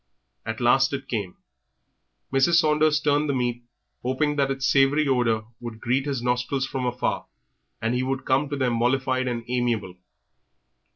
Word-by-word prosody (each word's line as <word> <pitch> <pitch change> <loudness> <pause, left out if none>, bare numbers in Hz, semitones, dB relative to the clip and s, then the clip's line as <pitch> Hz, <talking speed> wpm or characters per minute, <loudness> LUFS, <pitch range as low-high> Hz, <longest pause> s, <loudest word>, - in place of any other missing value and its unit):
At 110 0 -3
last 135 +3 +3
it 135 -1 -4
came. 100 -6 -4 1.0
Mrs. 135 +6 +4
Saunders 155 -2 +3
turned 145 0 +1
the 140 - +1
meat, 120 -1 -1 0.4
hoping 145 +4 0
that 140 -1 +1
its 135 -1 -2
savoury 140 +2 +3
odour 115 -5 +1
would 120 -2 -8
greet 130 +5 0
his 135 -4 -2
nostrils 125 +2 0
from 130 -2 -3
afar, 125 0 -2 0.6
and 115 +2 +1
that - - 0
he - - 0
would 130 +1 -2
come 135 +2 +1
to 145 - -3
them 130 -3 +1
mollified 130 +1 +1
and 120 -2 -2
amiable. 120 -6 -1
130 Hz, 165 wpm, -24 LUFS, 120-140 Hz, 1.0 s, Mrs